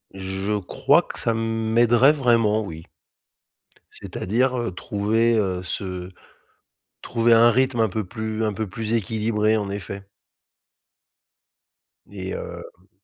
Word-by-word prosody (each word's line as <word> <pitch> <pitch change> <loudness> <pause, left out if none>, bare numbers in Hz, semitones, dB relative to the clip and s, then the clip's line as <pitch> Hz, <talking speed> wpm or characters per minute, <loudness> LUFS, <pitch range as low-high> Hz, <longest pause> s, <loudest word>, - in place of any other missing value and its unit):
Je 95 +2 -2
crois 95 - +2
que - - -5
ça 115 - +1
m'aiderait 115 +3 +3
vraiment, 115 -6 +2
oui 80 -5 -8 1.1
c'est-à-dire, 125 +6 -1
heu, 120 -3 -2
trouver, 105 +5 0
heu, 95 -4 -1
ce 90 0 -4 0.9
trouver 115 0 +1
un 115 +1 +6
rythme 130 -1 +1
un 110 - +3
peu 105 +2 -3
plus 110 +2 -4
un 105 - 0
peu 110 +2 -3
plus 110 +2 -4
équilibré, 110 0 +1
en 100 -2 -3
effet 100 0 -6 2.0
et 95 -2 -7
hem 90 +3 -9
110 Hz, 120 wpm, -23 LUFS, 100-115 Hz, 2.0 s, un